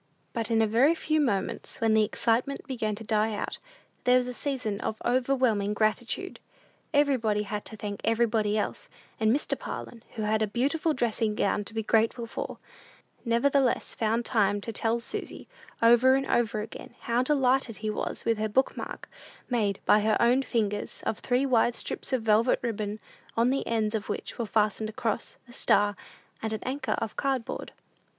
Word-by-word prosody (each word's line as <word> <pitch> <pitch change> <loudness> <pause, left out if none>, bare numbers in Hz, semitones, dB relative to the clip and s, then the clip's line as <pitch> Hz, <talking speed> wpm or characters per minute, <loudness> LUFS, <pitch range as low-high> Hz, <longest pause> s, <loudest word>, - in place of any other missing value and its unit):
But 230 -2 -2
in 225 -1 +3
a - - +2
very 255 +10 +4
few 310 -1 +1
moments, 205 -9 -1
when 225 -1 +3
the 220 0 +5
excitement 235 +6 0
began 230 -6 -2
to 220 - -8
die 215 0 +1
out, - - -4 0.4
there 250 0 +5
was 250 - +1
a 250 - -4
season 245 -7 -3
of 220 - -3
overwhelming 245 -5 +2
gratitude. 230 - -1 0.5
Everybody 255 -8 +2
had 210 0 -4
to 220 - -8
thank 205 -1 -5
everybody 220 -2 +2
else; 210 - -3 0.3
and 220 -1 +3
Mr. 280 +5 0
Parlin, 230 - -7
who 220 - -3
had 215 +1 +1
a 215 - +2
beautiful 285 +9 0
dressing 225 -3 0
gown 205 0 +1
to - - -8
be 220 - -1
grateful 225 +2 +2
for, 230 - -5 0.7
nevertheless 250 +2 +2
found 230 +1 0
time 205 -2 +2
to 230 - -5
tell 225 +2 +1
Susy, 235 - -5 0.4
over 240 +3 +6
and 270 0 0
over 220 -4 +1
again, 215 - -9
how 235 +1 +1
delighted 260 -4 +2
he 215 - +1
was - - -4
with 225 -2 +1
her 215 0 0
book 260 +6 +2
mark, - - -6 0.4
made, 210 -5 +1
by 210 - +6
her 215 +1 +2
own 245 +3 +4
fingers, 210 -5 -2
of 220 - -1
three 255 +2 +1
wide 240 -2 +3
strips - - -5
of 255 -4 0
velvet 225 +3 +4
ribbon; 215 -2 -2 0.4
on 235 +2 +4
the 275 - -1
ends 220 -2 0
of 215 -3 -3
which - - -5
were 230 - -1
fastened 215 0 +1
a - - -8
cross, 225 -2 -3
a 240 - -14
star, 205 -2 +3 0.5
and 220 0 -2
an 220 - -4
anchor, 270 +3 -2
of 225 -2 -3
card 270 -4 0
board. - - -6
225 Hz, 185 wpm, -28 LUFS, 215-250 Hz, 0.7 s, over